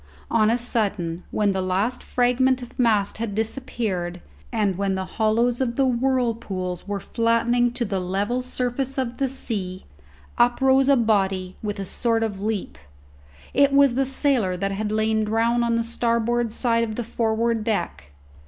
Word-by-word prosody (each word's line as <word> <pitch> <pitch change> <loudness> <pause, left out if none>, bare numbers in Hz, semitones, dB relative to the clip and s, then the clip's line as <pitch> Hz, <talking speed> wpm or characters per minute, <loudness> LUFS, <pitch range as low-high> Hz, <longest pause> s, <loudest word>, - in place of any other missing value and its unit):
On 215 -2 +4
a 235 - +2
sudden, 200 -8 -1
when 210 -1 +1
the 190 -1 -1
last 195 +7 -1
fragment 250 +1 +1
of 245 - -13
mast 215 -4 +2
had 225 -3 -3
disappeared, 215 -6 -2 0.3
and 200 -3 +1
when 195 0 -1
the 190 0 -3
hollows 230 +5 +1
of 235 -2 -1
the 270 - +2
whirlpools 230 -8 -1
were 200 -1 -2
flattening 235 +3 +1
to 240 -1 -1
the 195 -2 -2
level 200 +7 -1
surface 255 +1 -3
of 245 -2 -2
the 270 -1 0
sea, 200 -8 -4 0.5
up 240 0 +4
rose 265 0 +4
a 280 - +6
body, 195 -5 +1
with 205 -1 -4
a 195 - -3
sort 225 +3 0
of 205 -3 -3
leap. 210 - -3 0.7
It 280 0 +4
was 280 -2 +5
the 270 +2 +1
sailor 260 -8 +1
that 195 +2 -1
had 210 +2 -2
lain 220 0 +1
drowned 230 +2 +1
on 235 0 +1
the 230 - +1
starboard 235 0 0
side 230 0 +1
of 220 -2 -3
the 240 - -2
forward 230 0 0
deck. 70 - -2
230 Hz, 170 wpm, -23 LUFS, 200-245 Hz, 0.7 s, a